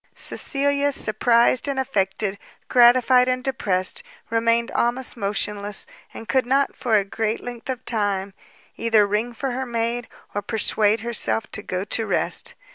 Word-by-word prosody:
Cecilia, 285 Hz, +1 st, 0 dB
surprised 235 Hz, +2 st, +2 dB
and 275 Hz, -1 st, -1 dB
affected, 200 Hz, -5 st, -1 dB, 0.3 s
gratified 250 Hz, +1 st, +5 dB
and 255 Hz, 0 st, 0 dB
depressed, 210 Hz, -, -1 dB, 0.3 s
remained 230 Hz, 0 st, +1 dB
almost 245 Hz, +2 st, +1 dB
motionless, 205 Hz, -1 st, -2 dB, 0.3 s
and 225 Hz, -, -10 dB
could 260 Hz, -2 st, +1 dB
not, 275 Hz, +2 st, +1 dB
for 235 Hz, -4 st, 0 dB
a 200 Hz, -, 0 dB
great 220 Hz, +2 st, -2 dB
length 245 Hz, 0 st, -8 dB
of 255 Hz, -1 st, -4 dB
time, 200 Hz, -3 st, -1 dB, 0.4 s
either 225 Hz, -2 st, +3 dB
ring 210 Hz, +4 st, -1 dB
for 260 Hz, +3 st, -4 dB
her 260 Hz, +1 st, -3 dB
maid, 235 Hz, 0 st, -2 dB, 0.3 s
or 205 Hz, -, -2 dB
persuade 215 Hz, 0 st, +1 dB
herself 225 Hz, -1 st, +1 dB
to 215 Hz, -, -4 dB
go 185 Hz, -2 st, -3 dB
to 220 Hz, +2 st, -1 dB
rest. -, -, -1 dB
230 Hz, 145 wpm, -23 LUFS, 210-255 Hz, 0.4 s, gratified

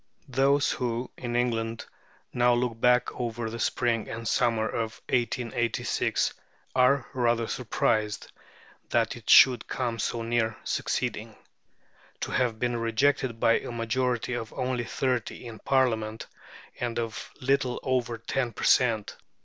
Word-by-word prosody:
Those 135 Hz, +2 st, +3 dB
who, 120 Hz, 0 st, -2 dB
in 120 Hz, -1 st, -4 dB
England, 115 Hz, -2 st, -1 dB, 0.5 s
now 120 Hz, 0 st, +4 dB
look 120 Hz, -2 st, -2 dB
back 125 Hz, 0 st, +4 dB
over 115 Hz, -2 st, -4 dB
the 115 Hz, -, -6 dB
spring 115 Hz, -1 st, 0 dB
and 115 Hz, 0 st, -5 dB
summer 115 Hz, -2 st, +2 dB
of 115 Hz, 0 st, -3 dB
1886 120 Hz, -1 st, 0 dB, 0.4 s
are 130 Hz, 0 st, +4 dB
rather 120 Hz, -2 st, +1 dB
surprised 110 Hz, -3 st, -1 dB, 0.6 s
that -, -, +1 dB
it -, -, -11 dB
should 125 Hz, -3 st, +7 dB
come 120 Hz, -3 st, -2 dB
so 115 Hz, +2 st, -2 dB
near 115 Hz, -1 st, 0 dB
succeeding. -, -, -2 dB, 0.9 s
To -, -, -3 dB
have 120 Hz, -3 st, +1 dB
been 120 Hz, +1 st, -1 dB
rejected 115 Hz, +1 st, +1 dB
by 115 Hz, -, +4 dB
a -, -, -8 dB
majority 120 Hz, +1 st, -1 dB
of 115 Hz, -2 st, -4 dB
only 125 Hz, -2 st, -2 dB
thirty 125 Hz, 0 st, -2 dB
in 115 Hz, -3 st, -8 dB
Parliament, 110 Hz, -5 st, 0 dB, 0.5 s
and 120 Hz, -1 st, -2 dB
of 115 Hz, -2 st, -4 dB
little 135 Hz, -1 st, +1 dB
over 125 Hz, -3 st, 0 dB
ten 120 Hz, +1 st, -2 dB
per -, -, -7 dB
cent. 115 Hz, -5 st, +3 dB
120 Hz, 135 wpm, -27 LUFS, 115-125 Hz, 0.9 s, should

